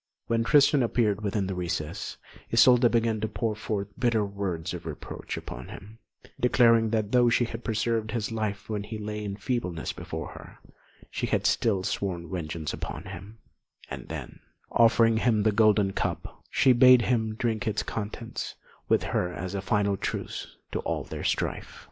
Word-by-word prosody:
When 115 0 +1
Tristan 140 +2 +5
appeared 110 -4 +1
within 100 -1 -1
the 95 - -3
recess, 85 -1 -3 0.3
Isolda 125 -1 +6
began 115 -2 +1
to 110 - 0
pour 110 -1 -2
forth 105 -2 -3
bitter 115 -4 +2
words 95 -4 -3
of 85 -2 -7
reproach 75 - -6
upon - - -7
him, 105 +3 -11 0.4
declaring 115 -2 +4
that 110 -2 -1
though 125 -1 +5
she 120 +1 +3
had 115 +1 -7
preserved 110 0 0
his 110 0 -2
life 105 -3 -3
when 105 -2 -2
he 110 +2 -6
lay 105 0 -4
in 100 -1 -4
feebleness 100 -6 -3
before - - -6
her, - - -12 0.5
she - - -2
had - - 0
still 100 -5 +2
sworn 90 -3 -3
vengeance 80 -3 -4
upon 75 - -5
him; 100 +2 -9 0.5
and - - -6
then, - - -7 0.3
offering 115 -1 +5
him 110 -2 +2
the 110 - +4
golden 105 -2 +3
cup, - - -4
she 130 - +4
bade 125 0 +7
him 110 -3 0
drink 110 -2 -1
its 105 -1 0
contents 115 +2 -5 0.3
with - - +3
her 90 - -1
as 90 +2 -5
a 100 - -2
final 100 0 +1
truce 95 - -5
to - - -2
all - - -2
their - - -7
strife. - - -2
110 Hz, 170 wpm, -27 LUFS, 100-115 Hz, 0.5 s, bade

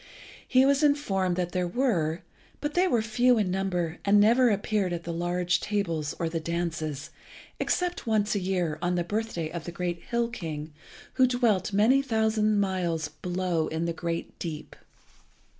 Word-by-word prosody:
He 260 0 +5
was 280 +1 +3
informed 200 - +2
that 175 -1 -2
there 180 0 0
were, 175 - 0 0.4
but 295 0 -3
they 360 +3 +3
were 235 -10 +2
few 240 +3 +3
in 200 -4 +1
number, 180 -3 -1
and 205 +1 +5
never 235 +4 +5
appeared 205 -3 0
at 170 -1 -4
the 170 - -4
large 175 +1 0
tables 170 -8 -2
or 165 - -1
the 165 0 -2
dances, 160 -2 -3 0.5
except 355 -7 -1
once 215 -1 +2
a 205 - 0
year, 180 -5 -1
on 180 0 0
the 175 - 0
birthday 190 -5 -3
of 170 -2 -6
the 175 - -5
great 175 0 -3
Hill 235 0 0
king, 155 -7 -6 0.5
who 255 - +7
dwelt 235 -7 +1
many 225 +7 +4
thousand 220 -4 +1
miles 175 -5 -1
below 175 +1 -2
in 160 +1 -2
the 170 - -1
great 170 0 -4
deep. 160 -3 -6
185 Hz, 170 wpm, -27 LUFS, 170-220 Hz, 0.5 s, who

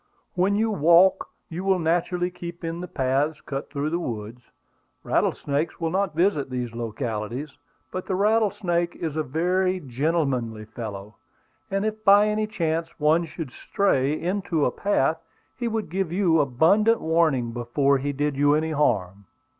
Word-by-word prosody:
When 190 +3 +2
you 220 +1 +1
walk, 175 +1 +4 0.2
you 175 +1 -6
will 195 -1 +3
naturally 175 +2 0
keep 175 -1 -8
in 165 +1 -4
the 180 - -5
paths 140 +2 0
cut 135 -1 -6
through 145 +1 -2
the 170 - 0
woods. 115 -4 -5 0.6
Rattlesnakes 145 +3 -1
will 165 -1 -1
not 190 -3 0
visit 165 -6 +1
these 125 -2 -4
localities. 115 +3 -4 0.4
But 185 - -5
the 190 - 0
rattlesnake 195 -4 +1
is 160 -3 -4
a 155 - +1
very 180 +6 0
gentlemanly 130 -6 -1
fellow; 105 -2 -8 0.5
and 195 +1 -1
if 215 0 -3
by 205 0 +6
any 215 0 0
chance 165 -5 -2
one 155 +3 +3
should 160 -3 -7
stray 150 - 0
into 175 -3 0
a - - +1
path, 165 -4 0 0.3
he 240 - -3
would 220 -1 -2
give 190 -2 -1
you 175 -3 +3
abundant 165 - +3
warning 160 -7 +1
before 135 +4 +1
he 145 +2 -2
did 145 +1 -1
you 145 +1 +4
any 160 +1 0
harm." 100 - 0
160 Hz, 155 wpm, -24 LUFS, 135-185 Hz, 0.6 s, by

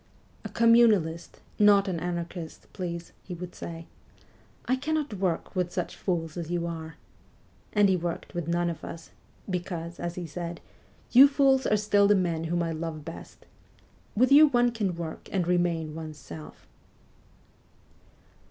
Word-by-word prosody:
' - - -32
A - - -6
Communalist, 220 -8 +3 0.2
not 205 -1 +6
an 180 -3 -2
Anarchist, 170 -1 -5
please,' 170 -2 -5
he 180 - -7
would 175 +1 -8
say. 165 0 -7 0.4
' - - -31
I 255 - +2
cannot 300 -1 -2
work 185 -3 -2
with 180 -1 0
such - - -3
fools 165 -3 -2
as 170 -2 -4
you 175 -1 -1
are 160 -2 -6 0.4
;' - - -33
and 205 -1 +5
he 190 - +3
worked 175 -1 -4
with 175 -2 -3
none 170 0 0
but - - -27
us, 165 0 -10 0.2
' - - -30 0.2
because,' 175 -2 -4
as 175 0 -4
he 180 - -5
said, 170 +1 -6 0.3
' - - -32
you 265 +3 +9
fools 275 -2 +3
are 210 - +3
still 205 -1 +3
the 205 - +5
men 170 -4 0
whom 170 +1 0
I 165 - -2
love 160 -2 -5
best. 165 - -10 0.7
"With 255 +5 +3
you 300 +2 +9
one 245 -3 +3
can 205 -6 -2
work, 165 -2 -7
and 180 -3 0
remain 170 -3 0
one's 155 -1 -7
self.' 80 -2 -11
175 Hz, 170 wpm, -27 LUFS, 165-205 Hz, 0.7 s, you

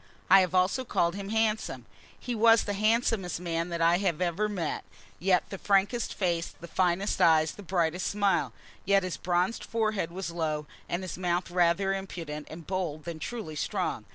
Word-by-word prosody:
I 195 - +9
have 185 -1 -1
also 185 +8 +2
called 170 -8 +1
him 200 0 -6
handsome. 220 0 0 0.3
He 245 - -4
was 225 0 +5
the 205 - -2
handsomest 215 -4 +1
man 170 -1 -2
that 170 -1 -3
I 170 +2 +4
have 180 -6 0
ever 185 +4 0
met, 180 -7 -3 0.4
had 185 -2 +4
the 195 - -5
frankest 205 +4 +1
face, 170 -3 -1
the 170 - -9
finest 185 +3 0
eyes, 160 -1 +5
the - - -11
brightest 180 -2 0
smile. 190 - +1 0.3
Yet 195 0 +3
his 185 -2 -3
bronzed 180 +5 0
forehead 215 -6 -1
was 185 -1 -4
low, 155 -3 -2 0.2
and 175 +2 -2
his 185 -1 -6
mouth 175 -1 -1
rather 180 +2 +2
impudent 170 -6 -6
and 160 +1 -9
bold 175 -5 -3
than 170 -2 -6
truly 205 -4 -5
strong. - - -2
185 Hz, 180 wpm, -28 LUFS, 170-200 Hz, 0.4 s, I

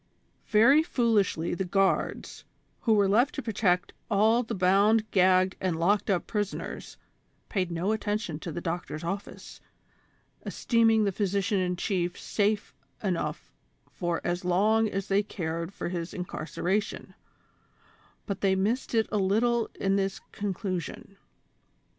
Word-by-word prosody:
Very 235 +8 +6
foolishly 220 - +1
the 175 - -1
guards, 195 +1 0 0.4
who 225 - +2
were 200 -1 +4
left 235 +8 +3
to 280 - -3
protect 195 -5 0 0.2
all 220 +3 +4
the 230 -1 -4
bound, 200 +4 +4
gagged 185 0 +4
and 180 -3 0
locked 200 +5 +2
up 185 -3 +1
prisoners, 205 -2 -4 0.5
paid 185 -4 -1
no 175 +4 -1
atten 210 -1 -1
tion 170 -9 -6
to 170 - -6
the 175 - -5
doctor's 165 -2 -4
office, 195 +4 -6 0.8
esteeming 225 -2 +2
the 200 - +1
physician 200 +1 0
in 180 -1 0
chief 175 -1 -2
safe 210 0 -1 0.3
enough 185 -4 -2 0.4
for 175 -2 -2
as 175 +1 -2
long 210 +5 +3
as 195 -1 -3
they 195 +1 +3
cared 170 -4 -4
for 200 - -5
his 170 -1 -4
incarceration; 185 +3 -3 1.1
but 195 -3 -4
they 195 -1 +3
missed 220 +6 -1
it 225 -1 +3
a 210 - +1
little 225 +4 +2
in 195 0 +1
this 195 0 -1
conclusion. 195 -1 -4
195 Hz, 135 wpm, -28 LUFS, 180-215 Hz, 1.1 s, Very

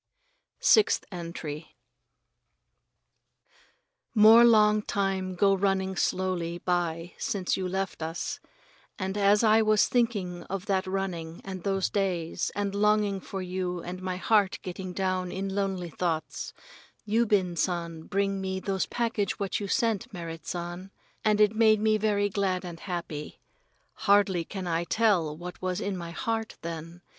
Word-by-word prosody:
Sixth 435 - +4
Entry 170 -3 -6 2.4
More 220 +2 +8
long 215 -2 +5
time 195 -2 -1
go 195 +2 +4
running 190 -1 0
slowly 180 -2 -1
by 175 -1 -1
since 200 -5 -1
you 190 - -3
have 180 - -3
left 190 -2 -3
us, 160 +1 -3 0.6
and 190 0 -3
as 205 +1 +4
I 220 0 +5
was 215 -1 +4
thinking 205 -8 0
of 195 0 -4
that 190 -2 0
running 180 -4 -3
and 190 -2 -6
those 195 0 0
days 180 -5 -1
and 200 -1 -1
longing 210 -1 +2
for 190 0 -6
you 180 -1 -3
and 180 +1 -6
my 185 -1 -3
heart 205 0 +2
getting 185 0 -5
down 185 -1 -1
in 195 0 -3
lonely 190 -3 -2
thoughts, 160 -3 -2 0.5
Yubin 210 -5 +2
San 170 -2 -2
bring 195 0 0
me 190 0 -2
those 190 0 -1
package 230 -4 -1
what 200 -2 -2
you 205 - -4
sent, 230 +3 0
Merrit 165 -4 -7
San, 175 +2 -5 0.3
and 210 -1 +3
it 210 0 +4
made 220 -1 +5
me 215 0 +2
very 205 -1 +2
glad 190 -2 -1
and 170 -2 -7
happy. 170 -5 -5 0.5
Hardly 200 -4 +3
can 190 +1 -6
I 170 -1 0
tell 175 -5 +1
what 180 +1 -8
was 185 0 -1
in 200 -2 -2
my 170 -2 -6
heart 225 +5 -3
then. 165 +1 -7
190 Hz, 145 wpm, -28 LUFS, 175-205 Hz, 2.4 s, More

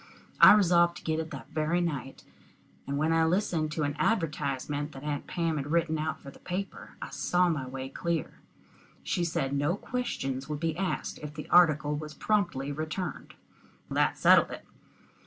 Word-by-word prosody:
I - - +10
resolved 175 -4 +4
to - - -12
get 160 0 -1
it 160 0 -4
that - - -9
very 160 +3 0
night, 145 -6 -3 0.6
and 140 0 -2
when 155 +2 +2
I 165 0 +4
listened 160 -3 +1
to 155 - -1
an 145 0 -1
advertisement 150 - -1
that 135 - -10
Aunt 150 -1 -3
Pam 165 -3 -1
had 145 0 -4
written 165 -1 +1
out 155 +1 -2
for 140 - -10
the - - -17
paper, 185 +2 -6
I - - -7
saw 180 0 +2
my 145 -6 -2
way 130 +1 -5
clear. 165 +4 -3 0.6
She 175 - -1
said 140 -5 -1
no 145 +5 +1
questions 135 - -3
would 150 -1 -3
be 160 -1 -1
asked 190 +1 -3
if 150 0 -8
the 150 - -7
article 150 -4 +5
was 150 0 -7
promptly 170 -10 0
returned. 155 +4 -5 0.6
That - - +2
settled - - +6
it. - - -8
155 Hz, 175 wpm, -29 LUFS, 145-175 Hz, 0.6 s, I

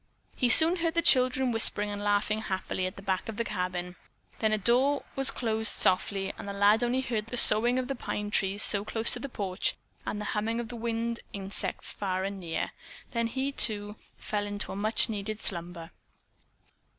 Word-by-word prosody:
He 250 - +1
soon 325 +7 +8
heard 330 -1 -1
the 335 - +2
children 255 -3 +4
whispering 210 -2 +2
and 205 0 -5
laughing 205 +1 0
happily 190 -2 -3
at 185 - -8
the 195 - -11
back 190 +1 -2
of 220 - -6
the 235 - 0
cabin, 180 -3 -4 0.4
then 220 -1 +1
a 215 - +2
door 250 +7 +1
was 270 0 +1
closed 220 -2 +2
softly 195 +1 0
and - - -8
the 200 - -4
lad 205 +3 +3
heard - - 0
only 255 +2 0 0.2
the 230 +3 -6
soughing 240 +2 +5
in 255 - -1
the 275 - -3
pine 210 -4 -5
trees 195 0 +1 0.2
close 225 0 +2
to 245 - 0
the 280 - -6
porch 195 -5 -2 0.3
and 210 - -4
the 210 - -5
humming 225 +2 -1
of 240 -1 -5
the 245 - -7
winged 230 0 -3
insects 195 0 -4
far 190 -2 -3
and 195 0 -4
near. 170 -3 -4 0.4
Then 235 -1 -1
he, 265 +4 -3
too, 210 -5 0 0.2
fell 205 -1 -3
into 205 0 -4
a - - -6
much 215 +3 +2
needed 215 0 -4
slumber. 170 -3 -4
215 Hz, 195 wpm, -28 LUFS, 200-240 Hz, 0.4 s, soon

